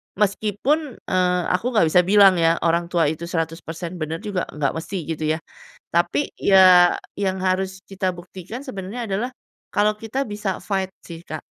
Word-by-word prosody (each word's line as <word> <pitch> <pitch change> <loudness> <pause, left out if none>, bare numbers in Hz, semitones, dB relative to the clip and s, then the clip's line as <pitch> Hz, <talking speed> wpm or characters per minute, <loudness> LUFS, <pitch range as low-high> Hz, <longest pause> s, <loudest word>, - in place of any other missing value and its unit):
Meskipun, 215 +8 0
eee, 180 -1 +1
aku 180 +5 -1
gak 210 - +5
bisa 180 - +6
bilang 195 -2 +6
ya, 165 0 +4
orang 170 +1 +2
tua 170 -1 +1
itu 160 +2 -6
100% 165 +1 -4
benar 160 +1 -3
juga 200 -4 -2
ga 150 -2 -1
mesti 165 +4 -5
gitu 155 0 -3
ya. 155 +1 0 0.6
Tapi, 175 +11 +1
ya 185 -2 +6 0.2
yang 190 -1 -1
harus 190 0 0
kita 190 -1 -2
buktikan 185 - -9
sebenarnya 215 +1 -5
adalah 210 +5 -2 0.4
kalau 210 +1 +2
kita 225 +6 -3
bisa 205 -3 -3
fight 190 -2 -2 0.2
sih 165 -1 -9
Kak, 155 -2 -6
185 Hz, 160 wpm, -22 LUFS, 170-205 Hz, 0.6 s, bisa